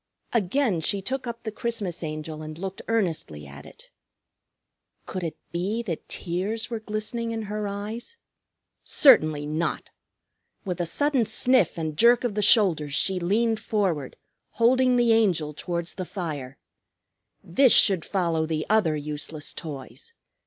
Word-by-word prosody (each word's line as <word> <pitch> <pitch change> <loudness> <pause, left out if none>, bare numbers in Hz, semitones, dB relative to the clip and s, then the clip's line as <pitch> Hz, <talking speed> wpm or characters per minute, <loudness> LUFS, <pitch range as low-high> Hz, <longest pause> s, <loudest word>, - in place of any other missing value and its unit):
Again 225 -2 +1
she 200 +5 0
took 260 +6 -4
up 235 0 -6
the 220 - -4
Christmas 210 -6 -3
Angel 155 -1 -5
and 155 0 -8
looked 190 +2 -6
earnestly 165 - -1
at 70 +1 -11
it. - - -16 1.1
Could 185 - -5
it 165 - -4
be 195 +7 -2
that 170 -8 -5
tears 195 +7 -3
were 230 - -2
glistening 220 +2 -3
in 225 -1 -3
her 210 0 -3
eyes? 215 - -6 0.7
Certainly 155 - +5
not! 155 +3 -2 0.7
With 180 -2 -2
a 170 - -1
sudden 285 - +1
sniff 250 +2 +3
and 155 -2 -3
jerk 235 +8 +5
of 240 -4 -1
the 210 - -1
shoulders 165 - +4
she 190 -1 +1
leaned 220 +5 +1
forward, 190 - -1 0.4
holding 255 +2 +3
the 240 -2 +4
Angel 175 -9 +2
towards 170 +2 -4
the 185 - -5
fire. 145 -9 -5 0.9
This 250 +9 +4
should 190 -6 +5
follow 165 -4 0
the 155 -1 -2
other 200 -8 +3
useless 150 0 -5
toys. 160 - -9
190 Hz, 145 wpm, -25 LUFS, 160-225 Hz, 1.1 s, Certainly